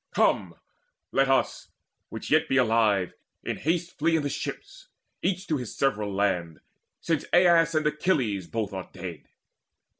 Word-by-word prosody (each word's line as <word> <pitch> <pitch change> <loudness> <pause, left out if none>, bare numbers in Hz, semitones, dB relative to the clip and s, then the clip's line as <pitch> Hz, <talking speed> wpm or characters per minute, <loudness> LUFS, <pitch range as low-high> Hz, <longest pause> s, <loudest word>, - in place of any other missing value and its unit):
Come, - - +2 0.6
let 135 0 +2
us, 135 - +1 0.4
which - - -7
be 135 - +3
yet - - +4
alive, 110 -5 +2 0.3
in - - -3
haste 170 +3 -2
Flee 165 +2 +3
in 160 - +1
the 145 - -1
ships, - - -6 0.3
each 185 0 -1
to 155 - 0
his 125 -5 -6
several 105 -7 0
land, 90 -5 -1 0.4
Since 165 -4 -1
Aias 170 -2 +5
and 155 -1 +1
Achilles 130 - 0
both 110 -1 -3
are 95 -1 -6
dead. 90 -4 -8
135 Hz, 150 wpm, -27 LUFS, 100-165 Hz, 0.6 s, Aias